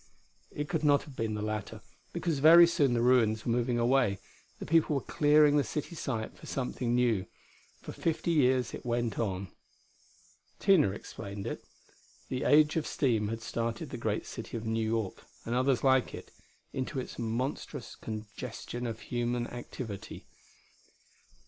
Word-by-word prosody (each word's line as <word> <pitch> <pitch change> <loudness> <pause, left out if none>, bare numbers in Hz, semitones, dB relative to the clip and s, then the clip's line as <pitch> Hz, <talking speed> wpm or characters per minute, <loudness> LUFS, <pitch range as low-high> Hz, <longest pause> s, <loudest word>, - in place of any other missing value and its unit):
It 145 0 -4
could 160 -1 -2
not 145 -1 +4
have 145 -3 -12
been 110 -2 -2
the 105 - -3
latter, 110 -1 -4 0.3
because 165 -5 -1
very 165 +4 +9
soon 140 -7 +2
the 120 - +1
ruins 115 -4 +3
were 120 - +1
moving 120 0 +1
away: 120 -4 +2 0.4
the - - -7
people 160 -2 +3
were 135 - 0
clearing 150 0 +4
the 145 - +3
city 150 +4 -4
site 115 -9 -4
for - - -13
something 125 -2 -2
new. 115 -7 +2 0.6
For - - -6
fifty 165 +1 -1
years 130 -5 +2
it - - -7
went 120 -2 -1
on. 95 -4 -2 1.1
Tina 190 - +4
explained 100 0 -7
it. - - -5 0.7
The 130 0 -2
age 150 +1 +5
of 155 - -1
steam 115 -7 +1
had 115 +1 -4
started 115 0 -3
the - - -4
great - - -2
city - - -6
of 115 - -6
New 110 0 0
York, 110 -4 -2 0.2
and 115 - -2
others 130 0 +2
like 130 -2 +3
it, - - -11 0.4
into 130 0 -3
its 125 - -7
monstrous 120 +2 -3
congestion 115 +2 -6
of 110 -1 -5
human 120 0 -1
activity. 120 -4 -7
120 Hz, 160 wpm, -30 LUFS, 115-140 Hz, 1.1 s, very